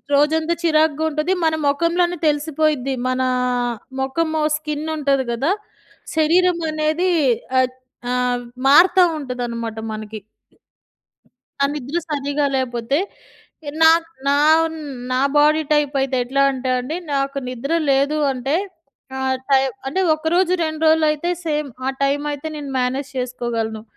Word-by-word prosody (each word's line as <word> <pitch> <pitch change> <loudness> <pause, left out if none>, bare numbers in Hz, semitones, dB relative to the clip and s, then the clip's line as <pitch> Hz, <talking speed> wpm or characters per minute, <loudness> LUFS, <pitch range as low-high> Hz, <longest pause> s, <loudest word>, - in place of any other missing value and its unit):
రోజంతా 315 +3 +2
చిరాకుగా 315 -2 +2
ఉంటది. 305 +4 -1
మన 315 - +2
మొఖంలోనే 340 +4 +1
తెలిసిపోయిద్ది 295 -2 0
మనా 255 0 0 0.7
మొఖము 315 +4 -1 0.2
స్కిన్ 305 0 -4
ఉంటది 275 -2 +1
కదా, 270 +8 0 0.7
శరీరం 345 +3 +3
అనేది 310 +4 0 0.5
ఆ - - +6 0.5
ఆహ్, 250 -1 0 0.3
మారుతా 355 +6 +6 0.2
ఉంటుందనమాట 235 -4 -4 0.2
మనకి. 215 0 -7 1.4
ఆ - - +5
నిద్ర 295 +4 -3
సరిగ్గా 285 0 0
లేకపోతే. 245 +1 -1 0.8
నా 320 - +9 0.4
నా 280 - +4 0.8
నా 255 +1 +1 0.2
బాడీ 305 +2 +4
టైప్ 295 -1 +2
అయితే 270 -1 0
ఎట్లా 275 +3 +1
అంటే 260 -1 -3
అండి. 260 +7 -4 0.2
నాకు 275 0 -1
నిద్ర 255 +5 -4 0.2
లేదు 280 +3 +2 0.2
అంటే 265 +3 -2 0.6
ఆ - - -4 0.3
టైమ్ 270 -1 +3
అంటే 290 +8 -1
ఒక 310 +1 -3
రోజు, 365 0 +3
రెండు 315 -1 -4
రోజులు 315 0 +4
అయితే 305 +3 -2 0.2
సేమ్ 300 -1 -1 0.2
ఆ - - +2
టైమ్ 280 +1 +1
అయితే 290 +2 -6
నేను 285 -2 -6
మేనేజ్ 260 +3 -1
చేసుకోగలను. 235 -3 -3
285 Hz, 125 wpm, -20 LUFS, 260-315 Hz, 1.4 s, నా